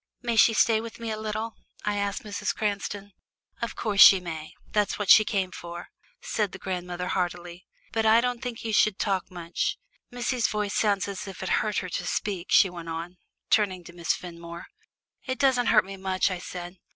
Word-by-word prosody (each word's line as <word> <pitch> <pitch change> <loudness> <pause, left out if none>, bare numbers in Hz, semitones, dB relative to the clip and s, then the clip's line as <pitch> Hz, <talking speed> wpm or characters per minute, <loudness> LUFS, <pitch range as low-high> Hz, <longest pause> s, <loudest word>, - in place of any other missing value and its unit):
"May 235 -1 0
she 225 0 +6
stay 220 0 +4
with 230 0 -9
me 230 -1 -4
a - - -1
little?" 215 +1 -4 0.3
I 210 0 0
asked 200 0 -2
Mrs. 205 -1 -3
Cranston. 205 -1 -3 0.5
"Of 235 - -3
course 205 -3 +1
she 195 - +10
may 160 -3 -7 0.2
that's 210 -1 +1
what 205 -2 +3
she 215 - +9
came 195 -3 -1
for," 175 -1 -8 0.3
said 210 -3 -1
the - - -6
grandmother 180 -1 -4
heartily. 175 -1 -3 0.2
"But 225 0 +1
I 220 +1 +7
don't 245 0 -1
think 245 -3 -5
you 220 - -2
should 210 -1 +4
talk 195 -3 -1
much. 175 -1 -3 0.3
Missie's 245 -1 0
voice 210 -1 -2
sounds 205 -2 +1
as 200 0 -6
if 190 -1 -7
it 190 - -3
hurt 210 -1 +1
her - - -6
to 180 0 -3
speak," 190 -3 -2
she - - +6
went 170 -2 -8
on, 170 +2 -6 0.3
turning 190 -4 +2
to 175 - -12
Miss 170 -1 -1
Fenmore. 170 -1 -8 0.6
"It 260 0 -2
doesn't 260 -4 +3
hurt 215 -3 +5
me 195 0 -8
much," 190 0 0
I 185 - -3
said. 175 +1 -7
200 Hz, 200 wpm, -27 LUFS, 180-220 Hz, 0.6 s, she